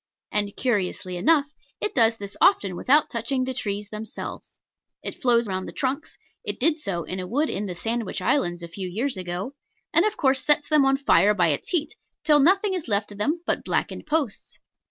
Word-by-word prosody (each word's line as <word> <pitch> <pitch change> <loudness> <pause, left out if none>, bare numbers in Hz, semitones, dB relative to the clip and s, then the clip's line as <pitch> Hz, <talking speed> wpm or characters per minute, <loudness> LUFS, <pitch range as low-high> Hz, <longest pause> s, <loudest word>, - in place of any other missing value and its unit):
And 205 -1 0
(curiously 190 -6 -1
enough) 290 - +2 0.3
it 420 - -2
does 225 -2 +4
this 200 -1 -7
often 205 - +4
without 285 +11 +3
touching 255 +3 -1
the 260 0 -2
trees 205 -4 -3
themselves. 215 +1 -7 0.4
It - - -5
flows 240 -2 +3
round 190 -2 -3
the - - -6
trunks 270 +3 -3 0.3
(it - - -4
did 325 -1 +2
so 190 - -3
in 185 +4 -5
a 180 - -4
wood 290 +9 0
in 205 +1 -3
the 180 - -5
Sandwich 225 +3 -2
Islands 175 -4 0
a - - -5
few 185 +2 -6
years 235 +8 -1
ago), 185 +6 -4 0.4
and 335 - +6
of 430 0 0
course 265 -2 +2
sets 295 -1 +3
them 305 -3 +5
on 270 0 +3
fire 210 -7 +4
by 180 -4 +3
its 145 - -2
heat, 315 -3 -1 0.3
till 300 -1 +5
nothing 385 +7 +4
is 360 -6 -3
left 205 -1 0
of 205 - -10
them 315 +10 0
but - - -1
blackened - - -2
posts. 295 -8 -2
235 Hz, 200 wpm, -25 LUFS, 200-295 Hz, 0.4 s, and